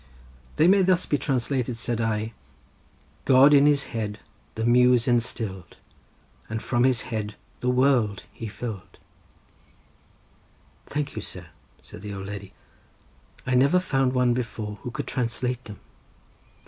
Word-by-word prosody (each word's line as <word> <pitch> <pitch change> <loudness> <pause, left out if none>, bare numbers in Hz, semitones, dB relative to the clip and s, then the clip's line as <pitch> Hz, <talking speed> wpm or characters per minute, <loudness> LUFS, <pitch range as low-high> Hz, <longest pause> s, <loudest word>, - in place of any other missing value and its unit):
"They 160 - +4
may 195 +2 +6
be - - +4
thus 185 -1 +3
translated," 130 -3 -1
said 115 0 -2
I: 110 0 -1 0.9
"God 135 +2 +7
in 145 0 +6
his 145 -1 +3
head 105 -2 -3 0.4
the 110 - -2
Muse 125 0 +4
instill'd, 110 -7 -1 0.7
And 110 +1 -3
from 120 +2 +1
his 130 -3 +3
head 105 -1 -3 0.2
the 125 - -1
world 125 -5 +2
he 115 - -7
fill'd." 110 -2 -7 1.9
"Thank 145 -1 -3
you, - - -4
sir," - - -8 0.3
said - - -12
the 100 -1 -6
old 95 0 -6
lady; 100 -1 -7 0.9
"I 130 - -1
never 140 +8 +4
found 135 -7 0
any - - -5
one 125 -1 +3
before 110 -4 -4
who - - -5
could - - -5
translate 125 0 -2
them." 105 -3 -10
120 Hz, 140 wpm, -25 LUFS, 110-130 Hz, 1.9 s, God